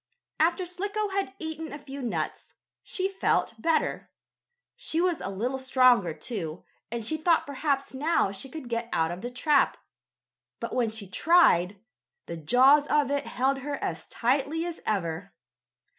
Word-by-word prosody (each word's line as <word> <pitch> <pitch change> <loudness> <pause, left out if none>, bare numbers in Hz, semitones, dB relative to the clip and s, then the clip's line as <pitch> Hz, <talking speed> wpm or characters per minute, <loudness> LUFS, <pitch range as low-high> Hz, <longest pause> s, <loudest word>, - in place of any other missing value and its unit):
After 345 +3 +2
Slicko 405 +4 -2
had 390 0 -2
eaten 320 -1 -6
a 290 - -6
few 280 -1 -8
nuts, 245 - -4 0.3
she 375 0 -2
felt 390 -10 0
better. 325 +3 0 0.7
She 320 - -2
was 355 -2 +1
a - - -3
little 240 +7 -2
stronger, 255 -8 +4
too, 165 0 -5 0.3
and 235 -2 -3
she 315 +7 -1
thought 330 +1 +3
perhaps 280 -1 -1
now 290 -6 +1
she 200 +7 -8
could 300 -2 -8
get 230 0 -3
out 160 0 +1
of 175 +2 -6
the 245 - -4
trap, 290 +4 +2 0.8
but, - - -5
when 240 -3 +1
she 220 -1 -8
tried, 205 - +4 0.5
the 170 - -6
jaws 260 - +5
of 290 -2 +2
it 285 0 -1
held 270 +2 0
her 285 +2 -3
as - - -4
tightly 280 +7 0
as 345 -1 -5
ever. 175 -4 -2
270 Hz, 160 wpm, -27 LUFS, 225-320 Hz, 0.8 s, jaws